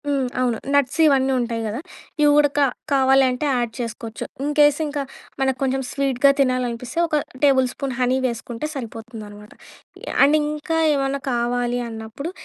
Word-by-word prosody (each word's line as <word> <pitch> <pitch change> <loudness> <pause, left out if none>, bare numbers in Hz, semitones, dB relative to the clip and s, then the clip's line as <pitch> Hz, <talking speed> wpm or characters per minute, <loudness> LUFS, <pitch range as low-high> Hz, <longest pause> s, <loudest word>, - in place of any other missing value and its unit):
హ్మ్. 275 -3 0
అవును. 245 -3 +1 0.2
నట్స్ 285 +2 +1
ఇవన్నుంటాయి 260 -5 +2
గదా! 215 +4 -4 0.4
ఈ - - +5
ఉడక 290 -1 +3 0.3
కావాలంటే 265 0 +3
యాడ్ 240 -2 -1
చేసుకోచ్చు. 230 -1 -5 0.2
ఇన్‌కేస్ 295 0 +3
ఇంకా 290 -1 -3 0.4
మనకు 265 -1 +1
కొంచెం 265 0 0
స్వీట్‌గా 275 0 +3
తినాలనిపిస్తే, 250 -1 -1
ఒక 310 - -1 0.3
టేబుల్ 265 -2 +4
స్పూన్ 275 -1 -4
హనీ 250 +1 +2
వేసుకుంటే 235 +2 -5
సరిపోతుందనమాట. 220 -3 -8 0.7
అండ్ 290 +2 +5
ఇంకా 300 +2 -2 0.2
ఏవన్నా 275 0 -1
కావాలి 245 0 0
అన్నప్పుడు, 225 +8 -7
260 Hz, 130 wpm, -22 LUFS, 240-280 Hz, 0.7 s, ఈ